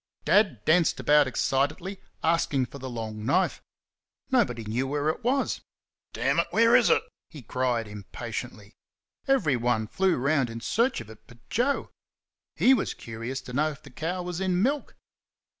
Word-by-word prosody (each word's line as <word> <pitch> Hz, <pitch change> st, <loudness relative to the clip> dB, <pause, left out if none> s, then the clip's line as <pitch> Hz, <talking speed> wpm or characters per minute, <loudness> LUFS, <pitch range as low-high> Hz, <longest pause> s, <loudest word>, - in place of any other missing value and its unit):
Dad 190 Hz, -, +3 dB
danced 160 Hz, -3 st, +3 dB
about 145 Hz, +2 st, +4 dB
excitedly, 145 Hz, -, -1 dB, 0.2 s
asking 160 Hz, -5 st, +2 dB
for 140 Hz, +4 st, -11 dB
the 130 Hz, 0 st, -6 dB
long 110 Hz, -3 st, -5 dB
knife. 140 Hz, -, +1 dB, 0.7 s
Nobody 195 Hz, -, +2 dB
knew 115 Hz, +5 st, -2 dB
where 145 Hz, +2 st, 0 dB
it 160 Hz, -, -3 dB
was. 265 Hz, +3 st, 0 dB, 0.5 s
"DAMN -, -, +1 dB
it, -, -, +2 dB
where 230 Hz, +1 st, +5 dB
is 245 Hz, -3 st, +5 dB
it?" -, -, +4 dB, 0.3 s
he 150 Hz, -5 st, -11 dB
cried, 120 Hz, -1 st, -1 dB
impatiently. 105 Hz, +1 st, -7 dB, 0.5 s
Everyone 125 Hz, -, +2 dB
flew 185 Hz, -, +1 dB
round 135 Hz, -1 st, +1 dB
in 115 Hz, 0 st, -6 dB
search 235 Hz, -, +1 dB
of 110 Hz, -, -12 dB
it 110 Hz, -, -14 dB
but 120 Hz, -1 st, -19 dB
Joe. 265 Hz, +5 st, 0 dB, 0.6 s
HE 265 Hz, -, +5 dB
was -, -, 0 dB
curious 115 Hz, +3 st, -6 dB
to 125 Hz, -, -10 dB
know 150 Hz, +4 st, +2 dB
if 145 Hz, -, -10 dB
the 135 Hz, -, -13 dB
cow 175 Hz, +7 st, -3 dB
was 175 Hz, 0 st, -4 dB
in 185 Hz, 0 st, +1 dB
milk. 280 Hz, +3 st, -1 dB
140 Hz, 160 wpm, -27 LUFS, 120-185 Hz, 0.7 s, where